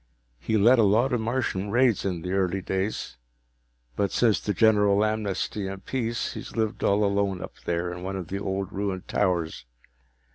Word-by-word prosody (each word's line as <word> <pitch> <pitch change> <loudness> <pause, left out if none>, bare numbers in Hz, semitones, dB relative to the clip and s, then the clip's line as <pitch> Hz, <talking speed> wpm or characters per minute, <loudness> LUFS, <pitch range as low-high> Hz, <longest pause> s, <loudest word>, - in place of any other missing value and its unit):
He 110 - 0
led 120 +5 +5
a - - +6
lot 115 +6 +3
of 120 - +1
Martian 110 -4 -1
raids 120 0 +3
in 90 -4 -2
the 90 - -3
early 95 -1 +1
days, 95 +3 -3 0.8
but 100 - 0
since 115 -4 +3
the 105 - -2
general 105 0 +4
amnesty 105 -1 -2
and 95 0 -7
peace 120 -3 -2
he's - - -8
lived 110 -1 -1
all 100 +1 +3
alone 100 -2 0
up - - -7
there, 85 +1 -1
in 90 - -8
one 95 +1 -4
of 90 -4 -5
the 100 - -3
old 95 0 -3
ruined 95 -2 -3
towers. 85 -9 -1
100 Hz, 180 wpm, -26 LUFS, 95-110 Hz, 0.8 s, a